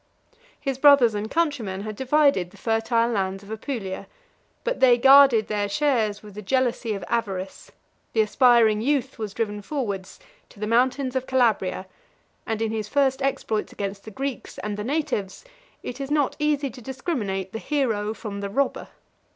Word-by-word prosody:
His 270 -2 -3
brothers 275 -6 +6
and 210 +1 -3
countrymen 270 - -1
had 215 0 -6
divided 265 - +2
the 205 - -18
fertile 230 +2 +1
lands 195 -2 -2
of 200 - -12
Apulia; 220 -4 -5 0.6
but - - -2
they 250 -2 +6
guarded 270 -4 +7
their 205 -1 -1
shares 215 -3 0
with 210 -1 -12
the 210 - -7
jealousy 245 0 0
of 195 - -6
avarice; 195 -5 -3 0.4
the 225 - +4
aspiring 225 -1 +4
youth 270 0 -1
was 210 -3 -5
driven 210 -2 -2
forwards 200 -7 -4 0.3
to - - -18
the 210 - -2
mountains 255 +3 +1
of 260 0 -1
Calabria, 220 -7 +1 0.6
and 225 0 -1
in 220 - -1
his 215 -2 -3
first 270 +2 +1
exploits 225 -5 -1
against 195 0 -5
the - - -9
Greeks 270 +4 -5
and 210 -1 -4
the 210 - -4
natives, 265 - -2 0.4
it 250 - -6
is 275 - -4
not 290 -2 +1
easy 295 -2 0
to 250 - -12
discriminate 225 - -3
the 225 - -4
hero 225 -9 -1
from 205 -3 -6
the 200 0 -4
robber. 275 +7 -1
230 Hz, 165 wpm, -24 LUFS, 205-270 Hz, 0.6 s, guarded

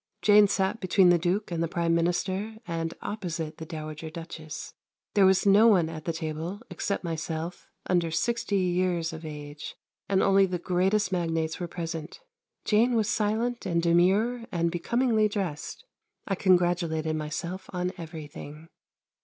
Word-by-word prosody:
Jane 210 0 +7
sat 195 +2 0
between 185 -2 +4
the 175 -1 +5
Duke 180 +4 -1
and 165 -1 -1
the 165 - +1
Prime 170 0 0
Minister 185 +5 0
and 165 -1 -3
opposite 170 -6 -4
the 160 - -7
Dowager 155 -1 -6
Duchess. 160 -1 -8 0.4
There 195 -2 +6
was 190 +1 +3
no 205 +3 +7
one 180 -7 +4
at 155 -1 -8
the 170 - 0
table, 160 +4 -4
except 200 - -2
myself, 165 0 -4 0.2
under 175 -2 +1
sixty 220 +3 0
years 180 -2 0
of 160 +1 -8
age, 150 -1 -7 0.3
and 195 -1 +3
only 195 0 +5
the 180 -1 -2
greatest 185 +3 +1
magnates 165 -3 -1
were 175 - -3
present. 165 - -6 0.5
Jane 230 +3 +3
was 220 -2 +1
silent 225 +3 0
and 170 -2 +1
demure 195 +8 +2
and 170 -1 0
becomingly 220 +5 +2
dressed. 195 - -4 0.4
I 195 - 0
congratulated 175 -4 +2
myself 170 +5 -4
on 180 0 -2
everything. 160 -2 -9
175 Hz, 150 wpm, -27 LUFS, 165-195 Hz, 0.5 s, Jane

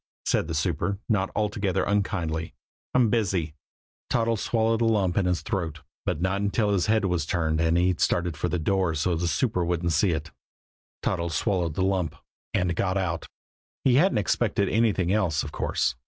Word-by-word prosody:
said - - +1
the 80 - -3
super, 85 +4 0
not 95 -4 +1
altogether 100 -3 0
unkindly. 90 -6 -1 0.4
"I'm 120 -4 +4
busy." 95 -9 0 0.6
Toddles 115 -2 +1
swallowed 115 0 +1
a - - +3
lump 100 -5 +2
in 95 -3 +2
his 90 -1 0
throat 80 -5 -3 0.3
but - - 0
not 95 +3 0
until 105 +1 +1
after - - +2
his 95 -3 +2
head 110 -1 +2
was 90 -4 0
turned 80 0 0
and 80 +1 +3
he'd 90 0 +2
started 85 -2 +1
for 90 +5 -2
the 90 - 0
door 90 0 +1
so 85 +4 +1
the 85 +2 -1
super 90 - 0
couldn't 85 0 0
see 80 +5 +3
it. 80 -2 -2 0.7
Toddles 85 -3 -1
swallowed 90 -6 0
the 95 - 0
lump 95 -5 0 0.4
and 90 -2 0
got 95 +2 0
out. 85 -3 -2 0.6
He 130 - +4
hadn't 170 - +4
expected 105 -1 +1
anything 100 -5 +2
else, 85 -7 +1
of 75 - -6
course. - - 0
90 Hz, 185 wpm, -26 LUFS, 85-105 Hz, 0.7 s, I'm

